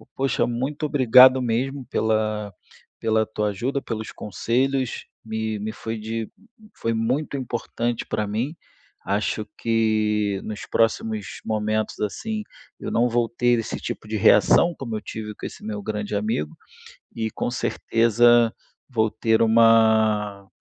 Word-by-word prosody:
Poxa, 135 0 +1
muito 135 +6 -2
obrigado 130 -1 +7
mesmo 130 +3 -1
pela 110 -1 0 0.5
pela 110 -1 +1
tua 105 -1 -2
ajuda, 130 +8 -2
pelos 110 -3 -5
conselhos, 130 +5 -1 0.2
me 110 0 -3
me 110 +2 -3
foi 110 0 -5
de 110 +1 -4 0.5
foi 115 - -1
muito 125 +7 -1
importante 120 -2 -3
pra 105 -1 -2
mim, 115 +10 -2 0.5
acho 105 +2 -1
que 110 -3 +1
nos 110 0 -6
próximos 110 -2 -1
momentos, 110 0 -1
assim, 215 - -3 0.4
eu - - -5
não 120 +2 +2
vou 120 0 +1
ter 120 0 +2
esse 115 - -4
tipo - - -6
de 110 0 -2
reação 105 - +5
como 115 -5 -5
eu - - -7
tive 105 -1 -6
com - - -8
esse - - -8
meu 105 -1 -4
grande 105 0 -3
amigo, 100 -8 -2 0.6
e 110 -1 -2
com - - -2
certeza 120 0 +3 0.4
vou 110 -4 +1
ter 110 +1 +1
uma 110 -3 +4
110 Hz, 135 wpm, -23 LUFS, 110-120 Hz, 0.6 s, obrigado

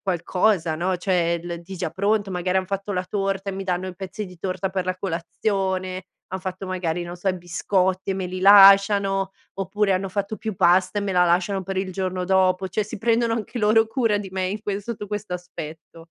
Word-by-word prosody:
qualcosa, 180 -2 +1
no, 180 +2 0
cioè, 175 -2 +1
l 170 -1 -5
di 190 +2 -9
già 170 -2 -3
pronto, 200 +2 0
magari 180 +1 -1
han 185 - -3
fatto 195 +1 -3
la 180 0 -1
torta 195 0 -2
e - - -6
mi 195 0 -5
danno 185 0 -1
i 180 - -9
pezzi 200 +2 -6
di 180 -1 -14
torta 190 +1 -2
per 185 -1 -2
la 185 0 -2
colazione, 185 +1 -2 0.2
han 190 - -4
fatto 185 0 -5
magari, 175 -2 -2
non 175 +1 -7
so, 180 - -11
i 185 - 0
biscotti 185 +2 0
e 190 - 0
me 190 -1 -3
li 185 +1 -5
lasciano, 195 0 +6 0.2
oppure 195 +1 0
hanno 190 +1 -1
fatto 200 +2 -3
più 220 -2 -4
pasta 180 +4 +3
e - - -3
me 200 - -2
la 180 0 +4
lasciano 185 +3 +1
per 195 0 -4
il 190 -1 -3
giorno 185 -1 -2
dopo, 190 0 +2
cioè 205 +3 -1
si 215 +1 -7
prendono 230 +1 +2
anche 230 +2 -4
loro 220 +1 +4
cura 225 -4 +1
di 195 -2 -7
me 185 -1 -1
in 205 +3 -4
ques 200 -1 -3
sotto 210 -3 -5
questo 210 -3 -4
aspetto. 165 -2 -9
190 Hz, 220 wpm, -23 LUFS, 180-200 Hz, 0.2 s, lasciano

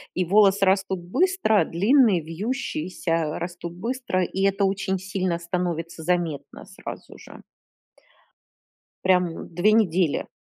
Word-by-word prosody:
и 185 - +1
волосы 200 +1 +4
растут 190 -1 +1
быстро, 265 - +2
длинные, 205 - +3
вьющиеся, 165 - -3
растут 175 0 -6
быстро, 230 0 -2
и 190 +2 -2
это 195 +1 +2
очень 190 0 -1
сильно 185 -2 -2
становится 170 -1 -3
заметно, 175 -4 -2
сразу - - -10
же. - - -14 1.6
Прям, 180 -3 +1
2 190 +5 +3
недели. 185 -7 +1
185 Hz, 110 wpm, -24 LUFS, 170-200 Hz, 1.6 s, волосы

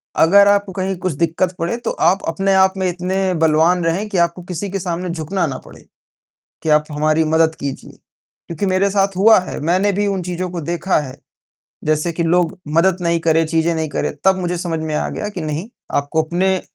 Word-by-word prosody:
अगर 200 +5 +6
आपको 200 -1 +2
कहीं 190 +1 -2
कुछ 180 -2 -2
दिक्कत 170 +4 0
पड़े, 170 +8 -1
तो 240 - -3
आप 190 +2 +1
अपने 195 +4 0
आप 190 0 +4
में 190 -1 0
इतने 185 +1 -1
बलवान 165 +2 +3
रहें 185 +6 0
कि 195 - -2
आपको 170 +1 0
किसी 185 +2 -5
के 195 - -2
सामने 180 0 -3
झुकना 170 +2 -2
ना 130 -2 -4
पड़े - - -14 0.8
कि 160 - -1
आप 150 0 +4
हमारी 155 +2 +1
मदद 160 0 +2
कीजिए 140 -1 -6 0.6
क्योंकि 170 +4 -3
मेरे 190 +1 +2
साथ 195 -1 +1
हुआ 220 +2 +6
है। 185 - -6
मैंने 185 +6 +2
भी 205 +1 0
उन 195 -2 -1
चीज़ों 180 +1 -4
को 175 - -4
देखा 170 +3 0
है, 130 -3 -7 0.7
जैसे 155 +2 0
कि 170 - -1
लोग 170 0 +1 0.2
मदद 180 +2 +3
नहीं 170 -1 +1
करें, 165 0 +2
चीज़ें 165 +1 +1
नहीं 160 -1 -2
करें, 145 - -2
तब 190 0 +5
मुझे 180 -1 -2
समझ 165 -2 -3
में 155 -1 -4
आ - - -1
गया 210 - -4
कि 185 -5 -6
नहीं 155 +6 -4 0.3
आपको 145 +3 +1
अपने 185 +3 0
175 Hz, 210 wpm, -18 LUFS, 160-190 Hz, 0.8 s, अगर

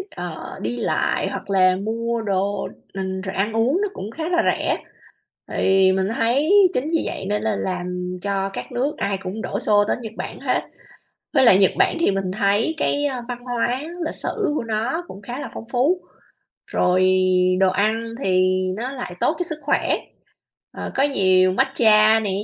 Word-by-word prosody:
ờ, 175 -3 -5 0.3
đi 120 +2 -3
lại - - 0
hoặc - - -6
là 185 -1 +4
mua 230 +3 -2
đồ 200 -1 -1 0.3
r - - -10 0.3
rồi 190 - -4
ăn 205 +3 0
uống 250 - +2
nó 415 - +1
cũng 205 +4 -6
khá 315 +6 -6
là 350 - +1 0.2
rẻ, - - -1 0.7
thì 190 0 +3
mình 190 0 +1
thấy 265 +9 +1 0.2
chính 255 - 0
vì 330 - +1
vậy - - -4
nên 210 0 0
là 220 -2 0
làm 180 0 -3
cho 195 -1 -1
các 195 - -7
nước 260 +5 -1
ai 200 -1 -1
cũng 195 +4 -5
đổ - - -3
xô 205 -1 +3
tới - - +1
Nhật 220 -2 -7
Bản - - -6
hết. - - 0 0.7
Với 270 -4 +5
lại 190 -5 +7
Nhật 195 -2 +4
Bản - - +3
thì 335 - +3
mình 195 -1 -2
thấy 205 +9 +1
cái, 290 0 0
ơ, 260 -4 -2
văn 245 -1 -5
hóa 245 0 -1 0.3
lịch - - -3
sử 405 -8 -2
của - - -1
nó 230 +9 -2
cũng 195 - -10
khá 245 +6 -6
là - - -5
phong - - -7
phú, 290 +9 +2 0.7
rồi 185 +1 +2 0.5
đồ 190 -1 +5
ăn 225 +3 0
thì 185 0 +3 0.2
nó 245 +5 -4
lại 250 -9 -6
tốt 310 - +2
cho - - 0
sức 320 -3 -3
khỏe, 285 - +1 0.8
ờ, - - -5
có 270 - +2
nhiều 185 -9 +3
matcha 215 +2 +4
nè, 210 -2 -2
215 Hz, 190 wpm, -22 LUFS, 190-250 Hz, 0.8 s, lại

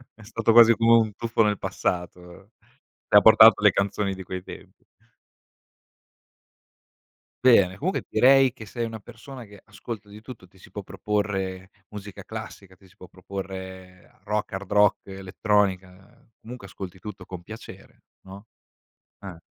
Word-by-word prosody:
È 105 - -17
stato 115 +1 -1
quasi 115 0 +7
come 115 +1 +2
un 110 -2 0
tuffo 115 -1 -1
nel 105 -1 0
passato; 90 +3 -5 0.6
ti - - +1
ha - - +8
portato - - +7
le - - +5
canzoni 100 0 -2
di 95 0 -9
quei 90 0 -7
tempi. - - -13 2.6
Bene. 100 -7 +5
Comunque 185 - -3
direi 130 +2 +4
che 110 - -11
sei 115 +3 -5
una 110 -2 -8
persona 120 +3 -12
che 100 -2 -16
ascolta 105 -1 -9
di 105 +1 -13
tutto. 110 -6 -12
Ti 95 - -25
si - - -18
può - - -7
proporre 95 -3 -4 0.2
musica 105 -1 -10
classica, 95 -2 -10
ti 95 - -21
si 90 - -25
può 90 - -15
proporre 95 +3 -10
rock, 105 -2 -3
hard 95 -1 -7
rock, 105 -1 +2
elettronica, 95 -1 -3
comunque 115 -3 -11
ascolti 95 -2 -10
tutto 105 -1 -10
con 90 -2 -9
piacere, 110 +5 -13 0.2
no? 100 +3 -13 0.7
Ah. 95 -4 -10
100 Hz, 150 wpm, -24 LUFS, 95-110 Hz, 2.6 s, ha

